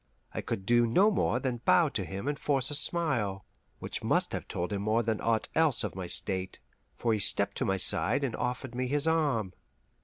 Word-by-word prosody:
I - - -3
could 95 - -4
do 120 +1 +4
no 190 - +4
more 160 - +1
than 130 -2 -2
bow 180 -4 +4
to 100 - -3
him 95 - -6
and 145 -1 -2
force 135 -2 0
a - - -3
smile, 130 - 0 0.3
which - - -5
must - - +1
have - - -5
told 90 +4 -3
more 110 +3 +1
than 110 -1 -1
aught 115 -1 0
else 160 -7 +2
of - - -3
my 95 -1 -5
state, 95 +1 -3 0.4
for 115 -2 +1
he 110 - 0
stepped - - +2
to - - -1
my 95 - +1
side 140 - +2
and 125 -5 -1
offered 125 0 -3
me 125 +1 -2
his 145 +3 0
arm. 145 - +1
120 Hz, 210 wpm, -29 LUFS, 100-145 Hz, 0.4 s, do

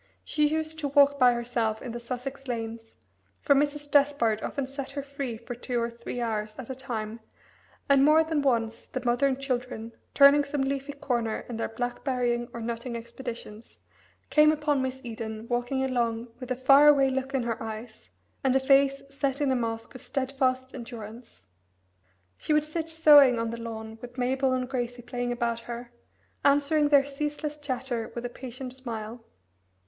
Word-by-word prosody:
She 300 -1 +2
used 315 +1 -2
to 295 - -1
walk 280 0 +4
by 250 -1 +6
herself 235 -2 -1
in 245 - -6
the 240 - -5
Sussex 255 +3 -6
lanes, 225 -1 -5 0.4
for 285 - +4
Mrs. 290 +1 0
Despard 280 -7 +3
often 280 - -3
set 270 0 -6
her 280 0 -4
free 275 -4 -5
for 235 +2 -7
two 245 0 -2
or 235 0 -1
three 235 +1 -6
hours 215 -2 -2
at 260 -1 -7
a - - -2
time, 230 -4 -5 0.7
and 275 -1 +5
more 310 +2 +6
than 315 -2 0
once 230 -4 0
the 255 -1 -5
mother 245 +3 +3
and 265 -1 -1
children, 250 -4 -3 0.2
turning 285 +1 +7
some 280 -1 -2
leafy 275 +1 -2
corner 245 -6 -2
in 235 - -5
their 230 - -2
blackberrying 245 0 -1
or 235 - -7
nutting 235 +1 -4
expeditions, 230 -2 -8 0.5
came 305 0 +6
upon 295 -2 +1
Miss 260 0 -3
Eden 220 -1 -6
walking 245 +2 0
along 235 -2 -1
with 255 - -8
a 255 - 0
far 275 +3 +6
away 275 -2 +6
look 265 +1 -2
in 260 - +1
her 230 -1 -3
eyes, 220 0 -8 0.3
and 265 -1 +3
a - - +5
face 275 +1 +3
set 275 0 -1
in 285 -2 +2
a - - +2
mask 225 -1 -3
of 255 - -10
steadfast 260 -1 -1
endurance. 230 - -9 1.0
She 305 - 0
would 300 0 +3
sit 320 +1 -4
sewing 295 -6 +7
on 230 0 -1
the 235 - -5
lawn 220 -1 -7
with 245 +1 -10
Mabel 260 +1 +1
and 255 -1 0
Gracie 245 -2 -3
playing 245 0 -3
about 235 -1 -1
her, 235 +1 -7 0.5
answering 290 +1 +3
their 285 -2 +6
ceaseless 295 +1 -3
chatter 255 -5 -3
with 240 0 -4
a - - -2
patient 255 +1 -8
smile. 230 -3 -6
255 Hz, 180 wpm, -27 LUFS, 235-280 Hz, 1.0 s, turning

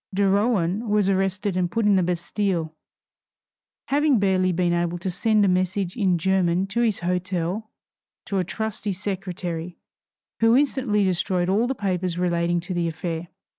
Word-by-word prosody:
De 200 +1 +1
Rohan 205 0 +1
was 205 -2 +2
arrested 195 +1 0
and 180 -1 0
put 225 +4 -1
in 205 -1 +5
the 190 - +3
Bastile, 175 -1 -1 1.2
having 290 -1 +3
barely 190 -2 +2
been 175 0 +1
able 175 0 0
to 180 +2 -3
send 215 +2 +3
a - - +3
message 185 0 0
in 190 -6 +2
German 185 0 +1
to 200 +4 -1
his 220 -6 +1
hotel 180 +3 -2 0.6
to 195 - -1
a - - +1
trusty 215 +2 -3
secretary, 180 -3 -5 0.6
who 225 +2 +5
instantly 260 -7 +1
destroyed 185 -1 0
all 215 +5 +2
the 265 - -2
papers 185 -4 -2
relating 175 -1 +1
to 180 +2 -5
the 175 -1 0
affair. 165 +1 -4
185 Hz, 160 wpm, -24 LUFS, 175-205 Hz, 1.2 s, in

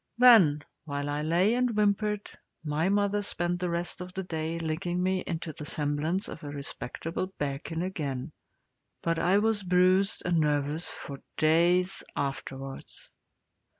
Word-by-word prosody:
Then, 205 -13 +7 0.2
while 145 -1 -3
I 145 +1 -1
lay 175 +7 +3
and 250 0 +2
whimpered, 210 0 +1 0.4
my 155 +3 0
mother 205 0 +2
spent 175 -3 -2
the 180 0 -1
rest 170 +1 -2
of 180 0 -7
the 190 - -2
day 160 -1 -3
licking 175 +2 -2
me 185 0 +1
into 165 -2 -3
the 150 - -7
semblance 150 +5 0
of - - -8
a 145 - -6
respectable 145 +4 -4
bearkin 145 +4 -3
again. 145 -6 -3 0.7
But 165 -1 +1
I 180 +4 +3
was 215 0 +2
bruised 185 +1 +3
and 175 -2 +2
nervous 150 +1 0
for 140 -1 -6 0.2
days 175 +4 +3
afterwards. 135 -1 -5
170 Hz, 145 wpm, -29 LUFS, 150-185 Hz, 0.7 s, Then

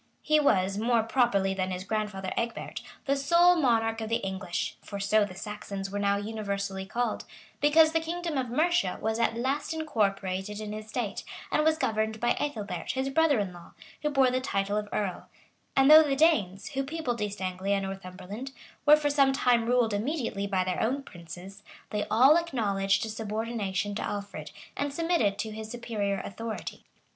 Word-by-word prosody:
He 305 0 +4
was, 195 -8 +2
more 230 0 +2
properly 225 -5 +2
than 190 -1 -2
his 185 0 -4
grandfather 200 -2 -3
Egbert, 235 0 -3 0.2
the 275 - +2
sole 340 +6 +5
monarch 225 -7 +2
of 220 - -4
the 230 - +2
English, 190 -2 -3
(for 200 - -7
so 205 +2 +3
the 185 -2 -10
Saxons 200 -1 -6
were 205 - -2
now 200 0 +2
universally 200 -2 -3
called,) 235 +1 -2 0.3
because 315 +2 +5
the 325 - +2
kingdom 335 0 -3
of 260 -3 -1
Mercia 305 - +1
was 220 +1 -1
at 230 0 +1
last 275 +6 -1
incorporated 205 -8 -1
in 210 -1 -5
his 215 0 -7
state, 220 -3 -3 0.3
and 305 - +2
was 315 0 +3
governed 220 -5 -1
by 240 +2 +2
Ethelbert, 205 -11 -3
his 265 +1 -1
brother 315 -1 +3
in 200 -4 -2
law, 175 -1 -13 0.3
who 300 - 0
bore 270 -3 +3
the 255 0 0
title 200 -4 -1
of 210 -1 -2
earl; 195 -4 -3 0.5
and 270 +2 +6
though 310 +1 +11
the 285 -3 +1
Danes, 220 - +2
who 270 0 -1
peopled 270 -6 -3
East 205 -1 -3
Anglia 190 +1 -1
and 195 -1 -1
Northumberland, 195 +6 -7 0.3
were 300 +1 +9
for 295 -1 0
some 275 -2 +4
time 245 -3 +2
ruled 240 -3 +2
immediately 225 -3 -2
by 190 -2 +1
their 185 0 -2
own 270 +5 0
princes, 180 +1 -11 0.3
they 210 -1 -1
all 270 +7 +6
acknowledged 210 -12 0
a - - -5
subordination 215 -2 -2
to 210 - -3
Alfred, 205 -1 -5 0.3
and 285 0 -2
submitted 330 - +1
to 220 - -3
his 215 0 -7
superior 215 -4 -2
authority. 225 +2 -6
220 Hz, 180 wpm, -28 LUFS, 200-270 Hz, 0.5 s, though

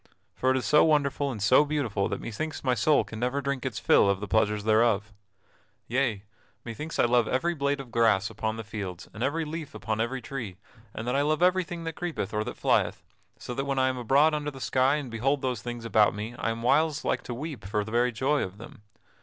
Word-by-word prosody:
For 130 - 0
it 130 - +3
is 125 - -3
so 150 +7 +5
wonderful 145 -2 +2
and 115 - -6
so 130 +7 +6
beautiful 140 -10 -1
that 100 - -3
methinks 155 +8 -5
my 130 -2 +2
soul 140 +6 +3
can 110 - -9
never 125 +4 0
drink 140 -2 -2
its - - -5
fill 100 - +4
of 100 -1 +1
the 105 - -5
pleasures 105 +1 +1
thereof. 110 -1 +2 0.7
Yea; 120 -5 0 0.4
methinks 150 +8 -6
I - - +4
love 120 -1 +3
every 170 +7 0
blade 140 -2 -1
of 130 -3 -9
grass 110 -4 +3
upon 110 0 -3
the 115 - -5
fields, 100 -4 -6
and 110 - -9
every 155 +5 0
leaf 155 -4 -6
upon 110 +2 -2
every 125 +3 -2
tree: 120 -8 -6 0.4
and 110 - -5
that 125 - 0
I 140 - +3
love 155 +3 +1
everything 180 -2 +1
that 165 0 -4
creepeth 160 - -4
or 105 0 0
that - - -6
flyeth, - - +1 0.3
so 125 - -6
that 135 +3 -2
when 135 -1 -1
I 130 0 +3
am 130 - -3
abroad 140 +6 +4
under 150 -1 -1
the 135 -2 -10
sky 130 +2 +2
and 140 -5 -4
behold 135 +5 0
those 125 -4 -1
things 120 -1 -6
about 105 -2 +3
me 105 +3 -5
I - - 0
am 115 0 -4
whiles 155 +4 +2
like - - 0
to 120 - -5
weep 145 - -6
for 105 +2 -1
very 120 +3 +1
joy 135 +6 +1
of 95 +1 -5
them. 110 -1 -12
125 Hz, 230 wpm, -27 LUFS, 110-145 Hz, 0.7 s, so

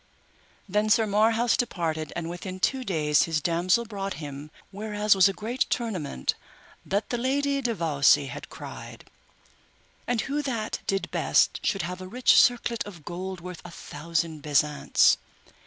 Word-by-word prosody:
Then 210 +2 +1
Sir 220 +1 +4
Marhaus 225 +3 +3
departed, 160 - -2
and 170 -1 -3
within 185 +2 -6
two 260 +7 +1
days 150 -8 +2
his 165 -2 0
damosel 175 +8 +1
brought 195 -3 -4
him 145 -1 -8 0.2
whereas 210 +1 +1
was 195 0 +5
a - - 0
great 225 +6 -6
tournament 180 - -2 0.5
that 200 +2 -2
the 240 - -1
Lady 280 +2 0
de 240 -3 -1
Vawse 145 -4 +3
had 130 - -8
cried. - - -10 1.0
And 240 -2 +1
who 290 +2 -2
that 235 -6 -3
did 195 0 -1
best - - +2
should 195 - 0
have 180 +2 -5
a 185 - -7
rich 245 +6 +3
circlet 240 -1 +1
of 170 -7 -11
gold 185 +1 -5
worth 180 -1 -8
a 175 - -9
thousand 160 -1 -3
besants. 150 0 +3
190 Hz, 155 wpm, -26 LUFS, 165-225 Hz, 1.0 s, was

